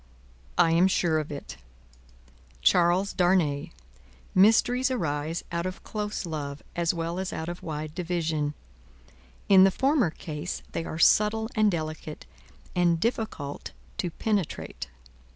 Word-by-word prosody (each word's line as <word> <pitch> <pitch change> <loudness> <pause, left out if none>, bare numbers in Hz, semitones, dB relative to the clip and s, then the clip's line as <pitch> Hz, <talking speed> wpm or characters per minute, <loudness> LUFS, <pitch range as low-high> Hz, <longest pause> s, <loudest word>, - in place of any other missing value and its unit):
"I 165 - +5
am 170 +3 +5
sure 170 -4 +2
of 155 -1 -5
it. 140 - -7 1.1
Charles 180 - +3
Darnay, 175 -6 +2 0.6
mysteries 235 +6 +4
arise 160 - -2
out 170 +1 -1
of 185 - -7
close 210 -2 -4
love, 145 -3 -5
as 170 -1 +2
well 170 +1 -3
as 190 -1 -3
out 160 - -4
of 175 +1 -5
wide 155 -1 -5
division; 160 -4 -1 0.9
in 190 -1 +8
the 195 - +7
former 265 - +2
case, 155 +1 -6
they 165 - -3
are 160 - -5
subtle 215 +6 +4
and 215 -1 +4
delicate, 155 -3 -5 0.5
and 175 -2 +3
difficult 215 - -3 0.3
to 180 - 0
penetrate. 200 0 -2
175 Hz, 130 wpm, -27 LUFS, 155-195 Hz, 1.1 s, in